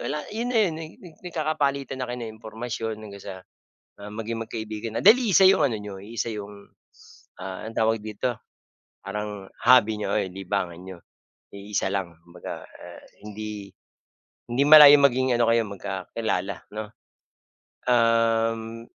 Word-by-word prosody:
wala," 150 - -2
'yon 235 +3 -3
na 250 - -1
'yon, 175 - -1
na 160 - -7
nag 160 - -14
nag 175 -4 -13
nagkakapalitan 150 -6 -2
na 130 - -2
kayo 125 0 -4
ng 110 - -7
impormasyon 115 0 -5
hanggang 100 -2 -10
sa, 100 - -7 0.7
ah, 100 - -8
maging 115 +1 -4
magkaibigan 110 0 -5
dahil 220 +5 +8
iisa 195 -1 +5
'yung 195 - +5
ano 125 -5 -1
n'yo, 105 -2 -8
iisa 115 +3 -4
'yung, 100 -1 -9 0.7
ah, 95 +3 -6
anong 115 - -9
tawag 110 0 +2
dito, 110 +3 -2 0.7
parang 105 -1 -5 0.2
hobby 110 -4 +5
n'yo, - - -1
o - - +2
libangan 95 -2 -3
n'yo, 95 -2 -10 0.5
iisa 100 -1 -3
lang 95 -4 -3
kumbaga. 85 0 -9 0.6
Hindi 105 -2 -7 0.9
malayong 145 -1 +10
maging 130 -1 +2
ano 120 - +3
kayo, 115 0 +4
magkakilala, 95 0 -3 0.2
'no. 105 0 -5 1.0
Uhm. 115 -1 +1
110 Hz, 140 wpm, -25 LUFS, 100-125 Hz, 1.0 s, malayong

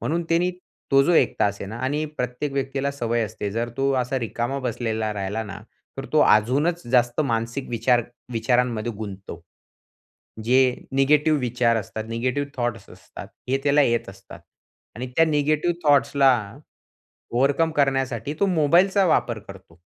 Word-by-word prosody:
म्हणून 170 +3 -1
त्यानी 175 +2 +2 0.4
तो 135 0 +6
जो 175 - +2
1 - - +3
तास 100 0 +2
आहे - - -5
ना 110 - -6
आणि 150 +3 -1
प्रत्येक 125 +3 -3
व्यक्तीला 135 0 -2
सवय 120 -3 -1
असते. 100 0 -5
जर 115 +1 -2
तो 135 0 +1
असा 130 +2 -2
रिकामा 120 +4 -3
बसलेला 110 -2 -2
राहिला 100 +3 -3
ना, 100 -2 -8 0.4
तर - - -5
तो - - +4
अजूनच 140 - +2
जास्त 120 +2 +3
मानसिक 115 0 -2
विचार 120 +1 +2 0.3
विचारांमध्ये 120 -1 0
गुंततो. 100 -4 -8 1.0
जे 125 +3 +4 0.3
निगेटिव्ह 150 +3 +3
विचार 120 -1 +1
असतात, 110 0 -5
निगेटिव्ह 125 +5 -2
थॉट्स 120 -4 -3
असतात, - - -11 0.2
हे 135 +1 +1
त्याला 145 +1 +4
येत 115 -4 0
असतात 95 0 -14 0.6
आणि 125 +2 -4
त्या 165 - +6
निगेटिव्ह 155 +2 +1
थॉट्सला 135 -5 +3 0.7
ओव्हरकम 140 +6 +2
करण्यासाठी 135 -1 0
तो 200 - +4
मोबाईलचा 180 +4 +3
वापर 120 -8 +1
करतो. 95 -4 -14
125 Hz, 145 wpm, -23 LUFS, 115-145 Hz, 1.0 s, तो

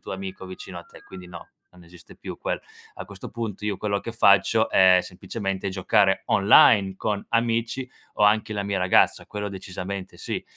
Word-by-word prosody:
tuo - - -8
amico 95 0 -7
vicino 95 -1 -9
a - - -10
te. - - -17
Quindi 90 -1 -12
no, 85 -1 -11 0.2
non 90 -1 -18
esiste 85 0 -16
più - - -9
quello. - - -3 0.3
A 95 - -8
questo 95 0 -10
punto 110 -3 -6
io 105 -2 -2
quello 100 -1 -2
che 115 - -7
faccio 110 0 +3
è 95 -1 +6
semplicemente 95 +1 -5
giocare 95 +1 +2
online 100 -1 +5
con 105 -1 -3
amici, 115 +2 -1 0.3
o - - +2
anche 105 +1 +2
la 100 - -2
mia 100 -1 -2
ragazza, 90 0 +2
quello 105 0 -5
decisamente 95 0 -7
sì. - - -5
100 Hz, 180 wpm, -24 LUFS, 95-105 Hz, 0.3 s, è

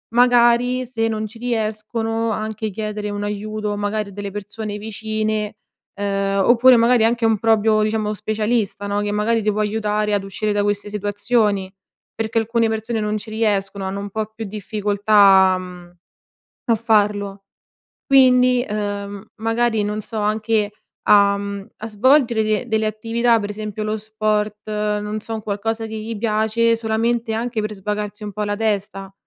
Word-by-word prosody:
Magari 245 +1 +4
se 225 -2 -1
non 215 -1 -2
ci 225 +2 -14
riescono 225 -1 -2
anche 215 0 -3
chiedere 210 0 -4
un 205 0 -4
aiuto, 210 0 -3
magari 205 0 -2
a - - -12
delle 200 0 -6
persone 210 +1 -6
vicine, 215 0 -3 0.4
ehm, 195 -1 0
oppure 245 +3 +6
magari 235 0 +4
anche 235 +1 +1
un 225 -1 +3
proprio, 220 0 +3
diciamo 215 0 -1
specialista, 210 -1 -1
no, 205 0 0
che 205 0 -2
magari 215 +2 +1
ti 210 - +2
può 210 - -3
aiutare 210 0 0
ad 200 - -1
uscire 205 +2 -2
da 205 0 +1
queste 205 0 -1
situazioni. 205 -1 0 0.5
Perché 225 0 -1
alcune 230 +1 +1
persone 220 +1 -2
non 210 0 -1
ci 215 +1 -9
riescono, 200 -3 -1
hanno 195 +1 -3
un 200 - -6
po' 220 +2 -2
più 225 - -5
difficoltà, 205 -2 +3
mhmm, 180 -1 -10 0.7
a - - +6
farlo. 205 -3 +1 0.6
Quindi, 255 -2 +5
ehm, 205 -1 -4
magari 225 0 +1
non 210 +1 -2
so, 220 +2 -7
anche 215 0 0 0.3
a, 200 -1 +5
mhmm, 200 -1 -6
a 220 - -6
svolgere 235 +1 +3
de 215 +2 0
delle 220 -1 +1
attività, 230 +2 +1
per 205 -1 -4
esempio 215 0 -5
lo 215 0 -1
sport, 215 -1 -1
non 210 0 -2
so, 225 +1 -6
un 215 - -6
qualcosa 225 +2 -2
che 220 0 -6
gli 220 +1 -5
piace 220 +1 +1
solamente 225 +1 -1
anche 230 0 -2
per 215 0 -4
svagarsi 210 +1 -4
un 205 - -5
po' 210 - -5
la 205 0 -1
testa. 200 -3 -2
215 Hz, 160 wpm, -20 LUFS, 205-225 Hz, 0.7 s, oppure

